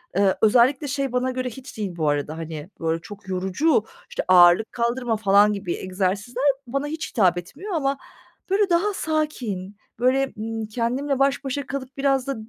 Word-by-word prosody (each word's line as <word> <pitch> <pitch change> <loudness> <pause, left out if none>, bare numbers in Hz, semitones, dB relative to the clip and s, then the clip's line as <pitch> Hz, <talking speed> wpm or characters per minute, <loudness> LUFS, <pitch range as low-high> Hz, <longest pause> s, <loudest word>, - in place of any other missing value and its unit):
eee, 195 -1 +3
özellikle 250 +6 +4
şey 275 -1 -2
bana 250 +1 0
göre 255 0 -3
hiç 255 +2 -11
değil 200 -5 -3
bu 155 -2 +1
arada, 145 +2 -2
hani, 160 0 -6
böyle, 165 0 -1
çok 195 +3 -12
yorucu, 190 - +1 0.2
işte, - - -3
ağırlık 180 +3 +6
kaldırma 235 0 0
falan 205 0 +4
gibi 200 -4 -3
egzersizler 195 +6 -2 0.2
bana 275 +4 -2
hiç 320 +1 -4
hitap 185 -5 +3
etmiyor 290 - -7
ama, 280 -4 0 0.5
böyle, 395 +1 +2
daha 360 +4 +2
sakin, 250 - -3 0.2
böyle, 260 +2 +2
ımm, 225 +1 -4
kendimle 250 +5 -1
baş 275 +1 +2
başa 275 +1 -3
kalıp 275 -1 -6
biraz 275 -1 +1
da 275 - -1
240 Hz, 170 wpm, -23 LUFS, 190-275 Hz, 0.5 s, ağırlık